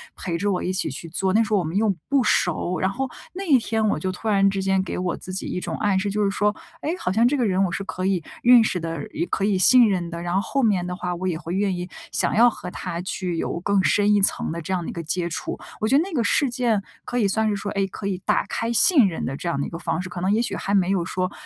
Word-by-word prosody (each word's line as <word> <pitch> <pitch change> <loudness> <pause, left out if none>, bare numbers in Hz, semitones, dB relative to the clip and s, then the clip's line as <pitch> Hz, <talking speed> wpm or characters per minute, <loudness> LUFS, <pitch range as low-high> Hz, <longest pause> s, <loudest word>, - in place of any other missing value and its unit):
陪 170 -3 -3
着 205 +3 0
我 180 - -1
一 185 - -1
起 185 - -1
去 145 +4 -7
做， 185 +3 -1
那 225 +2 +4
时 220 - -6
候 210 - +4
我 - - -1
们 160 +2 -4
又 210 -2 +2 0.2
不 275 -2 +3
熟， 180 -3 +1
然 190 - +1
后 260 +6 -3 0.2
那 385 +2 -5
一 290 -7 +5
天， 225 -2 -1
我 - - 0
就 185 +3 -2
突 185 +4 -7
然 195 -2 +4
之 195 0 -2
间 190 0 +2
给 190 - -5
我 180 -1 -2
自 185 - -8
己 190 - -3
一 180 - -3
种 - - -4
暗 205 -2 +1
示， 200 +1 -1
就 210 +1 0
是 200 - +2
说， 210 +1 +1 0.3
哎， 300 - -3
好 180 - -1
像 225 +5 +4
这 280 - +1
个 245 - +1
人 190 -2 +1
我 180 - 0
是 195 - -3
可 185 -1 -4
以 190 -3 0 0.2
认 245 -1 +7
识 185 -4 -1
的， 165 -3 -5
也 - - -1
可 195 - -2
以 200 -2 +2
信 235 +5 +6
任 180 -4 -1
的， 170 0 -6
然 175 0 -3
后 190 - +3
后 275 +6 -1
面 195 -6 +2
的 180 0 -4
话， 180 -1 -3
我 185 +2 -3
也 170 -3 -1
会 170 +1 -6
愿 195 -1 +1
意 175 +1 -5 0.2
想 - - 0
要 240 +3 +7
和 180 - -7
他， 170 0 -5
去 180 -2 -3
有 170 - -2
更 200 +1 +2
深 205 +1 +3
一 205 - +3
层 195 - +2
的 170 +1 -4
这 170 - -6
样 180 -2 -1
的 - - -5
一 - - -5
个 170 - -5
接 170 +2 -2
触。 160 - -4 0.2
我 215 - +1
觉 270 - +4
得 - - +4
那 390 - -7
个 250 -6 +1
事 270 +5 +2
件 240 -4 0 0.2
可 245 - -3
以 210 - +3
算 220 +2 +1
是 205 - 0
说， 205 +1 -4
哎， 195 -1 0
可 195 - -8
以 195 -2 -1
打 - - +2
开 230 +1 -2
信 255 - +6
任 170 - -3
的 135 - -3
这 - - -6
样 140 - -1
的 - - -1
一 - - -8
个 165 - -6
方 165 -1 -2
式， 185 - -7
可 180 0 -6
能 190 +2 +1
也 220 - +2
许 240 - -2
还 200 - -3
没 190 -2 +3
有 190 -3 +1
说， 185 +1 -2
195 Hz, 335 characters per minute, -23 LUFS, 180-215 Hz, 0.3 s, 认